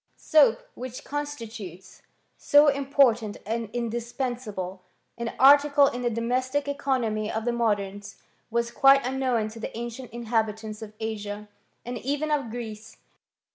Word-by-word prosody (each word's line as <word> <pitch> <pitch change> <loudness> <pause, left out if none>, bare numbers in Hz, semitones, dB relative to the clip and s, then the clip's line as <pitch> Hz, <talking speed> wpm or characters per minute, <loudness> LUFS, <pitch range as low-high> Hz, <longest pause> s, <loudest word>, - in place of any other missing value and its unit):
Soap, 280 -8 +4
which 255 0 -7
constitutes 225 - -7 0.3
so 290 0 +5
important 270 -6 +2
and 225 0 -3
indis 235 0 -3
pensable 210 -8 -4 0.4
an 235 0 -4
article 285 +1 +7
in 250 -2 -1
the 240 - +1
domestic 255 +5 -1
economy 240 -7 -1
of 220 +1 -3
the 240 - +2
modems, 205 -4 -1 0.3
was 235 0 -1
quite 270 +1 +5
unknown 255 -4 0
to 225 +1 -10
the 225 - -6
ancient 235 +1 -6
inhabitants 220 -2 -2
of 215 -1 -8
Asia, 210 -1 -5 0.4
and 245 -1 -4
even 290 +5 -2
of 280 -6 0
Greece. 220 -2 -7
235 Hz, 135 wpm, -26 LUFS, 220-265 Hz, 0.4 s, article